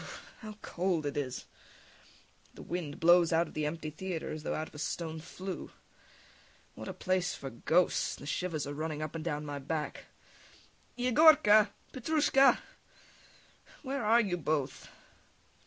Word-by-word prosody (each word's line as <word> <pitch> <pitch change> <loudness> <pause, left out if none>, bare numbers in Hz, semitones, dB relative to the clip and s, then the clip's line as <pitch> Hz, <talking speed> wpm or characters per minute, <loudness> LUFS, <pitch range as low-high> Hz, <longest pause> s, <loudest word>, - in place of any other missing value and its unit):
Brr.... - - -9 0.3
How 215 -3 -9
cold 175 -3 -1
it 145 - -2
is! 135 -3 -3 1.1
The - - -10
wind 165 -5 -4
blows 175 0 +6
out 165 +1 +3
of - - -13
the 150 -1 -1
empty 155 0 -4
theatre 175 +1 -4
as 155 - -5
though - - -2
out 155 +1 -3
of - - -27
a 150 - -9
stone 160 +1 -3
flue. 185 +3 -7 1.0
What - - -9
a - - -4
place 185 -1 0
for 135 -1 -7
ghosts! 165 +9 +1
The - - -11
shivers 155 -1 -2
are 145 - -5
running 155 0 -3
up 155 - -5
and 165 -1 -5
down 150 -2 -3
my 145 -1 -4
back. 150 +2 -4 0.9
[Calls] 245 - -2
Yegorka! 255 -6 +7 0.2
Petrushka! 275 0 +4 1.3
Where 275 -2 -3
are 225 +3 +5
you 190 -5 -1
both? 150 -4 -2
165 Hz, 155 wpm, -31 LUFS, 150-200 Hz, 1.3 s, Yegorka